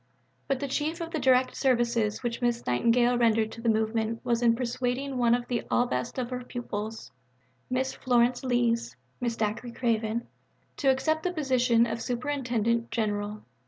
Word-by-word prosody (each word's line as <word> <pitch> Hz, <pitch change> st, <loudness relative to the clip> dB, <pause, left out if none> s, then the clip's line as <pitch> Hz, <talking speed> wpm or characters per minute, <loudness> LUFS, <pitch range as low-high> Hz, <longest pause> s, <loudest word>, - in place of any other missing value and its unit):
But 270 Hz, -2 st, 0 dB
the 280 Hz, -, -2 dB
chief 305 Hz, +5 st, -2 dB
of 335 Hz, -1 st, -5 dB
the 320 Hz, -, -1 dB
direct 260 Hz, -1 st, +3 dB
services 235 Hz, -4 st, +1 dB
which 240 Hz, +1 st, -2 dB
Miss 240 Hz, -1 st, 0 dB
Nightingale 240 Hz, -, +3 dB
rendered 225 Hz, -2 st, +3 dB
to 230 Hz, -, -9 dB
the 230 Hz, -, +1 dB
movement 220 Hz, +1 st, 0 dB
was 235 Hz, -1 st, +1 dB
in 230 Hz, -1 st, +4 dB
persuading 255 Hz, +2 st, -2 dB
one 240 Hz, -1 st, +4 dB
of 245 Hz, 0 st, -4 dB
the 240 Hz, -2 st, -1 dB
ablest 240 Hz, -, 0 dB
of 250 Hz, -1 st, -3 dB
her 250 Hz, 0 st, -4 dB
pupils 225 Hz, -3 st, -5 dB, 0.6 s
Miss 260 Hz, +1 st, 0 dB
Florence 245 Hz, 0 st, +2 dB
Lees 235 Hz, -, +1 dB, 0.3 s
(Mrs. 235 Hz, -2 st, -1 dB
Dacre 220 Hz, +3 st, -2 dB
Craven) 230 Hz, -1 st, -1 dB, 0.5 s
to 275 Hz, -, +2 dB
accept 290 Hz, +4 st, +2 dB
the 360 Hz, -, -1 dB
position 250 Hz, -7 st, +2 dB
of 230 Hz, 0 st, -3 dB
Superintendent 235 Hz, -3 st, -1 dB
General. 210 Hz, -2 st, -2 dB
240 Hz, 160 wpm, -28 LUFS, 230-255 Hz, 0.6 s, in